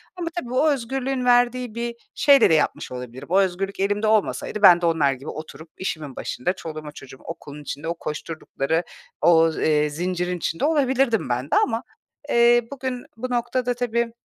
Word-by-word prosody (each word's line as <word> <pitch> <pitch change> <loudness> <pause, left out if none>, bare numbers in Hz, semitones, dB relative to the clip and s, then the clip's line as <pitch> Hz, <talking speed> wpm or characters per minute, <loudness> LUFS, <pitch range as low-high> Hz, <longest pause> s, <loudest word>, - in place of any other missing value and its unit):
ama 350 -2 -4
tabii 245 -6 -7
o 285 +5 +3
özgürlüğün 265 0 -2
verdiği 245 -1 +2
bir 235 0 -3 0.2
şeyle 280 -7 +6
de - - +4
yapmış 155 - 0
olabilirim. 125 0 -8
O 190 - +5
özgürlük 195 +1 -1
elimde 205 +2 +1
olmasaydı 215 0 0
ben 175 -3 +8
de - - 0
onlar 155 -5 +2
gibi 135 +3 -9
oturup 155 0 -9
işimin 155 -7 -4
başında 180 +9 -2
çoluğuma 155 -4 -8
çocuğum 130 -2 -12
okulun 150 -3 -9
içinde 145 +2 -6
o 170 - 0
koşturdukları 160 0 -3 0.4
o, 165 -1 +5
eee, 150 -1 +2
zincirin 180 +3 -2
içinde 165 - -2
olabilirdim 265 - +1
ben 125 +2 -1
de - - +3
ama, 225 +1 +2 0.5
eee, 240 0 +5
bugün 260 -2 -4
bu 255 +2 -4
noktada 245 +1 0
tabii 235 -1 -1
195 Hz, 170 wpm, -23 LUFS, 155-245 Hz, 0.5 s, ben